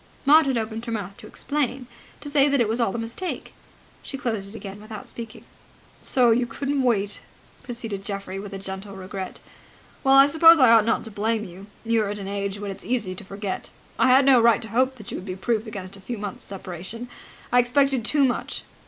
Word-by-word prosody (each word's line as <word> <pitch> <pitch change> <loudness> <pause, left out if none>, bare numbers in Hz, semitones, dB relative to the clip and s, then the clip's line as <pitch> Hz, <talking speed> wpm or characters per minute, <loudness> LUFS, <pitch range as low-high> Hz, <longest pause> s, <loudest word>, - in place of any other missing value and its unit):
Maud 300 +1 +7
had 265 -3 +1
opened 220 0 -3
her 230 - -4
mouth 200 -3 -4
to - - -11
explain, 270 -3 -2 0.4
to - - -7
say 285 0 +4
that 280 -1 +2
it 235 - +3
was 225 +3 0
all 195 -5 +1
a - - -1
mistake. 235 +11 -5 0.5
She 275 - -6
closed 220 -7 -3
it 210 - -12
again 200 -1 -8
without 215 -1 -9
speaking. 230 0 -9 0.6
"So 245 -3 +3
you 240 +2 +2
couldn't 275 +4 -2
wait!" 205 -5 +1 0.4
proceeded 225 -5 -5
Geoffrey 195 -1 -5
with 195 -1 -7
gentle 195 +1 -7
regret. 190 0 -7 0.6
"Well, 270 0 +5
I 275 0 +9
suppose 325 +2 +7
I 255 -4 +7
ought 225 -2 +6
not 230 - +1
to 225 - -4
blame 215 +2 -1
you. 190 +1 -10 0.2
You 230 0 +2
are 205 - -1
at 205 - -3
an 195 -1 -6
age 200 0 -3
when 205 -1 -4
it 195 - -7
is - - -15
easy 230 -7 -1
to 185 - -8
forget. 195 0 -5 0.3
I - - +5
had 260 +2 +6
no 260 -3 +6
right 235 0 +4
to 220 - -9
hope 260 +4 +1
that 210 -5 -10
you - - -4
would 185 - -8
be 185 - -4
proof 220 +3 -1
against 195 -3 -7
a 195 - -14
few 235 +5 -5
months' 205 -2 -6
separation. 190 +5 -7 0.4
I 245 - +5
expected 260 +1 +2
too 285 +5 +3
much. 250 - -2
225 Hz, 220 wpm, -24 LUFS, 200-255 Hz, 0.6 s, I